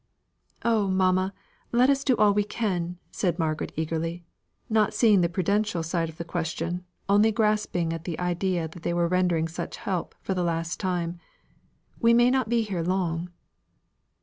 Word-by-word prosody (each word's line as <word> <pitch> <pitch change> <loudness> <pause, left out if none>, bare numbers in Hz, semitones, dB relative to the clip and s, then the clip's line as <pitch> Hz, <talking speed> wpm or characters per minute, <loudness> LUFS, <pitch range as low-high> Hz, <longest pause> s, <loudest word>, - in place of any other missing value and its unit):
"Oh, 220 -4 +3
mamma, 185 0 +2 0.4
let 245 +2 +4
us 275 0 +1
do 255 -4 +2
all 210 -1 +5
we 205 0 +2
can," 185 -5 -2
said 175 -3 -1
Margaret 160 -3 -1
eagerly, 165 +2 -3 0.4
not 215 -3 +2
seeing 210 -5 +5
the 170 - +2
prudential 185 0 0
side 165 0 -1
of 160 - -12
the 170 - -4
question, 170 +1 -3 0.2
only 205 +2 +5
grasping 210 -6 +1
at 165 -1 -6
the 170 -3 -3
idea 180 -1 -1
that 165 +2 -12
they 170 - -1
were 170 0 +2
rendering 175 -2 +1
such 165 - -6
help 185 -3 -3
for 190 - -1
the 180 - -1
last 165 0 -2
time; 175 -2 -2 0.8
"we 230 0 +5
may 240 +1 +5
not 260 -4 +1
be 235 -1 +2
here 195 -5 -3
long." 175 -1 -1
180 Hz, 170 wpm, -26 LUFS, 170-210 Hz, 0.8 s, all